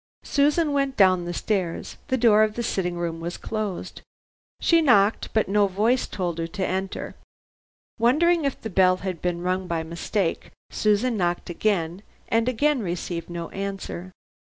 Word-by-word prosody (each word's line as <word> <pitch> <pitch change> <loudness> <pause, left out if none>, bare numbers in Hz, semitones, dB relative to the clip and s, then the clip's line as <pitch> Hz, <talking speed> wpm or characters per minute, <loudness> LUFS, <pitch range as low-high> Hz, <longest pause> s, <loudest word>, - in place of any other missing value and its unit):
Susan 295 +2 +2
went 275 -1 0
down 185 -3 +4
the 175 - -3
stairs. 185 -6 -2
The 260 -2 +1
door 225 -3 +5
of 215 0 +2
the 235 - -2
sitting 180 -5 -1
room 170 -1 -3
was 170 +2 -5
closed. 215 -4 -4 0.6
She 335 -1 +4
knocked 220 -8 +3
but 220 - +1
no 200 +1 +3
voice 220 +7 +1
told 175 -4 -3
her 165 - -2
to 185 +3 -3
enter. 190 +1 -3 0.9
Wondering 320 +8 +3
if 275 -2 -1
the 220 - -6
bell 185 0 +4
had 185 -4 -5
been 175 -1 -1
rung 185 +1 -1
by 165 -2 -1
mistake, 170 +3 -2 0.2
Susan 215 +3 +1
knocked 175 -1 -1
again, 175 -2 -1 0.3
and 230 +2 +2
again 285 +2 +1
received 175 -2 -4
no 170 -1 -5
answer. 195 -2 -5
195 Hz, 160 wpm, -24 LUFS, 175-230 Hz, 0.9 s, door